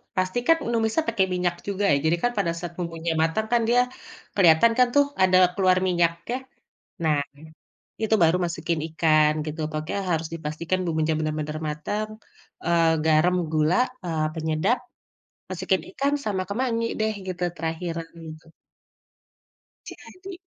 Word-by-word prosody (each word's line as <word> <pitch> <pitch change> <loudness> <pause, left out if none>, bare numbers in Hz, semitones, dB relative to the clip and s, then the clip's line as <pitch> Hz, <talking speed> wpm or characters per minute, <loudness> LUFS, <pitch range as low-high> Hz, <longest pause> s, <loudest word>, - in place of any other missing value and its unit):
pastikan 245 - +2 0.2
numisanya 225 +8 +1
pakai 200 -4 +2
minyak 180 -1 0
juga 200 0 -2
ya, - - +4
jadi 165 +2 +3
kan 245 - +3
pada 175 -4 +1
saat 175 0 -5
bumbunya 165 -1 -3
matang 190 +7 0
kan 235 - +4
dia 245 +1 +4 0.6
keliatan 180 +4 +6
kan 250 -1 +5
tuh 285 0 +6 0.2
ada 185 0 +5 0.2
keluar 185 -1 +3
minyaknya, 170 +5 0 0.7
nah 155 -2 +3 0.8
itu 220 0 +2
baru 165 +2 +4
masukin 170 -1 -2
ikan, 155 -1 +3
gitu. 155 +1 -6
Pokoknya 155 +4 -4
harus 160 -1 0
dipastikan 165 +3 -3
bumbunya 160 -1 0
bener-bener 155 0 -3
matang, 205 +9 -3 0.6
eee, 165 -1 +3
garam, 160 +3 +4 0.2
gula, 155 +2 +2 0.3
eee, 160 -2 -1
penyedap, 160 +9 +1 0.7
masukin 185 +1 0
ikan 280 +1 0
sama 195 -3 -1
kemangi 230 +1 -1
deh 215 0 +1
gitu 180 -1 -4
terakhiran 165 0 -4 0.2
gitu. 160 0 -11 1.4
Jadi. 370 0 -10
170 Hz, 135 wpm, -25 LUFS, 160-205 Hz, 1.4 s, keliatan